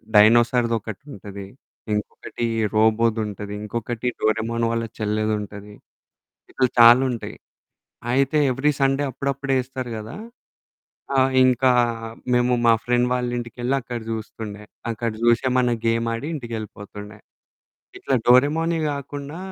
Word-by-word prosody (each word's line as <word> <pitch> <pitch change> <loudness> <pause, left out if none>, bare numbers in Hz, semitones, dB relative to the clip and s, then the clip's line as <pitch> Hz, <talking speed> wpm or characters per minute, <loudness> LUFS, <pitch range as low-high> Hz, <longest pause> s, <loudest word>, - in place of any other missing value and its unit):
డైనోసార్‌ది 115 +2 +5
ఒకటుంటది. 100 -3 -9 0.5
ఇంకొకటి 105 +3 -4 0.3
రోబోది 110 +1 +3
ఉంటది. 105 0 -6
ఇంకొకటి 115 +2 -4
డోరేమాన్ 115 +2 0
వాళ్ళ 115 0 -1 0.2
చెల్లేదుంటది. 105 -1 -2 0.8
ఇట్లా 130 - +2
చాలుంటాయి. 120 +1 +5 0.8
అయితే 135 +3 +2
ఎవ్రీ 135 +4 +1
సండే 135 +1 +2
అప్పుడప్పుడెస్తారు 135 -1 -2
కదా! 110 +9 -8 1.0
ఆహ్, 130 0 +4
ఇంకా 130 0 +3 0.6
మేము 125 0 +3
మా 115 - +7
ఫ్రెండ్ 125 0 +2
వాళ్ళ 125 -1 0
ఇంటికి 120 -1 -7
వెళ్లి 125 +3 0
అక్కడ 120 -1 -6
చూస్తుండే. 110 -1 -6 0.3
అక్కడ 115 +1 -2
చూసి, 120 0 +4
ఏమన్న 125 -1 +2
గేమాడి 115 +2 0
ఇంటికెళ్ళిపోతుండే. 105 -4 -8 0.8
ఇట్లా 135 - -1
డోరేమానే 155 +7 +4
కాకుండా 140 +2 -6
120 Hz, 105 wpm, -23 LUFS, 110-130 Hz, 1.0 s, మా